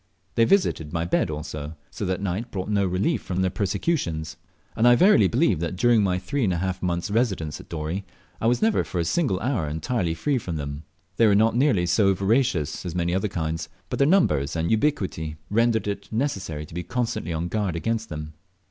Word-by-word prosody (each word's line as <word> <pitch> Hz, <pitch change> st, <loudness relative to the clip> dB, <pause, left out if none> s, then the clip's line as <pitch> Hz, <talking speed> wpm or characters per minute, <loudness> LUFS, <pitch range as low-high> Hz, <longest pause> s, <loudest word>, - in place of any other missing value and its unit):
They 115 Hz, -, +4 dB
visited 115 Hz, -, +2 dB
my 85 Hz, 0 st, -1 dB
bed 85 Hz, -, +1 dB
also, 75 Hz, 0 st, -5 dB, 0.2 s
so 105 Hz, -, -4 dB
that 95 Hz, +2 st, -2 dB
night 100 Hz, +5 st, -2 dB
brought 95 Hz, 0 st, -4 dB
no 100 Hz, -2 st, +2 dB
relief 95 Hz, -, 0 dB
from 90 Hz, 0 st, -2 dB
their 95 Hz, -, +1 dB
persecutions; 90 Hz, -, -1 dB, 0.4 s
and 115 Hz, +2 st, +3 dB
I 120 Hz, -, +8 dB
verily 180 Hz, -, +6 dB
believe 80 Hz, -, +2 dB
that 85 Hz, +2 st, -2 dB
during 115 Hz, +3 st, +4 dB
my 90 Hz, -2 st, +1 dB
three 140 Hz, +8 st, -2 dB
and 100 Hz, -, +2 dB
a 90 Hz, -, 0 dB
half 95 Hz, +1 st, -2 dB
months' 85 Hz, +2 st, -1 dB
residence 100 Hz, -10 st, 0 dB
at -, -, -18 dB
Dorey 85 Hz, +4 st, -3 dB, 0.4 s
I 115 Hz, -, +2 dB
was 120 Hz, -, +2 dB
never 220 Hz, -1 st, +3 dB
for -, -, -6 dB
a 85 Hz, -, +1 dB
single 130 Hz, -, +1 dB
hour 115 Hz, -, 0 dB
entirely 80 Hz, +3 st, -1 dB
free 135 Hz, -, 0 dB
from 90 Hz, -7 st, -5 dB
them. 70 Hz, 0 st, -5 dB, 0.3 s
They 115 Hz, -, +5 dB
were 100 Hz, -, +4 dB
not 110 Hz, +2 st, +3 dB
nearly 125 Hz, -9 st, +3 dB
so 95 Hz, +2 st, +3 dB
voracious 100 Hz, -, +1 dB
as 90 Hz, -2 st, -5 dB
many 85 Hz, 0 st, 0 dB
other 95 Hz, +3 st, +1 dB
kinds, 80 Hz, -3 st, -3 dB, 0.2 s
but -, -, -2 dB
their 140 Hz, -, +4 dB
numbers 75 Hz, -, +2 dB
and 80 Hz, 0 st, 0 dB
ubiquity 105 Hz, -, 0 dB, 0.2 s
rendered 115 Hz, 0 st, +2 dB
it 100 Hz, -, -4 dB
necessary 95 Hz, -, -2 dB
to 75 Hz, -, -15 dB
be 90 Hz, -, -3 dB
constantly 120 Hz, -5 st, -2 dB
on 80 Hz, +1 st, -2 dB
guard 100 Hz, -3 st, -1 dB
against 115 Hz, +5 st, -2 dB
them. 75 Hz, -1 st, -6 dB
95 Hz, 210 wpm, -25 LUFS, 80-115 Hz, 0.4 s, I